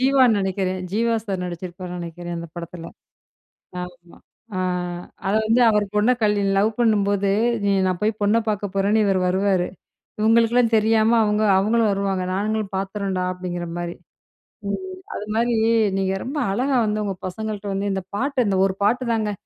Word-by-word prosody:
ஜீவான்னு 260 -4 +4
நினைக்கிறேன். 190 -1 -1
ஜீவா 230 +2 +1
சார் 190 -3 -3
நடிச்சிருப்பாருன்னு 180 +1 -6
நினைக்கிறேன், 175 0 -6
அந்த 170 0 -7
படத்துல. 170 0 -7 1.0
ஆமா. 175 -1 -11 0.4
அ - - -1 0.7
அது 205 - +2
வந்து 230 +3 +3
அவர் 210 -1 +2
பொண்ண 210 +4 +3
கல்லில் 205 -2 +2
லவ் 210 +3 +3
பண்ணும்போது 205 -3 +2 0.4
இ - - +3
நான் 185 -1 0
போய் 215 0 0
பொண்ண 205 +3 +3
பார்க்க 205 -2 -2
போறேன்னு, 205 +3 +2
இவர் 195 -1 +2
வருவாரு. 190 -1 +1 0.5
இவுங்களுக்குல்லாம் 230 +1 +3
தெரியாம 220 +1 +3
அவுங்க. 210 +1 +1
அவுங்களும் 220 +3 +2
வருவாங்க. 195 -1 -1
நாங்களும் 210 0 -1
பார்த்துர்றோன்டா! 195 -1 -2
அப்பிடீங்கிற 175 -1 -5
மாரி. 175 0 -4 0.8
ம் 375 - -4 0.2
அது 210 - -5
மாரி 235 +1 +2 0.4
நீங்க 190 0 0
ரொம்ப 280 +4 -5
அழகா 260 +7 0
வந்து, 210 0 -1
உங்க 195 -1 -2
பசங்கள்ட்ட 210 +2 -5
வந்து 200 +1 -1
இந்த 190 - -2
பாட்டு, 260 +1 0
இந்த 195 -1 +1
ஒரு 190 -1 -1
பாட்டு 245 +5 +2
தாங்க, 215 -2 0
205 Hz, 155 wpm, -22 LUFS, 185-220 Hz, 1.0 s, ஜீவான்னு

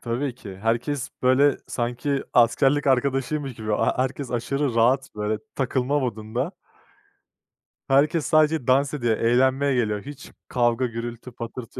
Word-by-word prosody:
tabii 125 +3 -2
ki. 100 -6 -10
Herkes 115 +6 -1
böyle, 130 +3 +4
sanki, 125 +4 -2
askerlik 135 +4 +3
arkadaşıymış 135 +1 0
gibi. 110 -1 -4
A - - +1
ha - - +2
herkes 130 0 -2
aşırı 130 +2 -1
rahat 130 +4 +2
böyle 105 0 -2 0.2
takılma 135 +1 0
modunda 120 - -3 1.4
Herkes 145 +3 +3
sadece 155 -3 +2
dans 135 +2 +3
ediyor, 120 -6 0
eğlenmeye 130 +4 +2
geliyor. 105 -4 0
Hiç 145 -1 -10 0.2
kavga, 120 0 +1
gürültü, 120 +1 -6
patırtı 115 +1 -8
130 Hz, 130 wpm, -24 LUFS, 115-140 Hz, 1.4 s, böyle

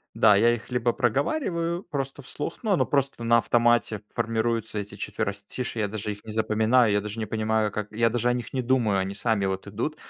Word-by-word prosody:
Да, 105 -2 +6
я 120 +3 +4
их 110 -4 -9
либо 125 -1 +1
проговариваю 170 - 0
просто 135 -3 -4
вслух, 145 - -6
но 215 - +1
оно 185 - +3
просто 135 -4 -1
на 115 0 +5
автомате, 120 -2 +2
формируются 115 -1 -1
эти 100 0 -6
четверостишья, 110 +4 -4
я 105 - 0
даже 105 0 -3
их 100 - -11
не 110 - -7
запоминаю, 110 +2 +3
я 105 - +2
даже 105 +2 -6
не 110 - -1
понимаю 110 0 0
как 105 0 -4
я 115 +1 +2
даже 120 0 0
о - - +3
них 120 -1 -5
не 130 - 0
думаю, 120 -6 +2
они 95 +1 -2
сами 110 -2 +1
вот 95 0 -3
идут. 115 +10 -3
115 Hz, 210 wpm, -26 LUFS, 105-125 Hz, -, Да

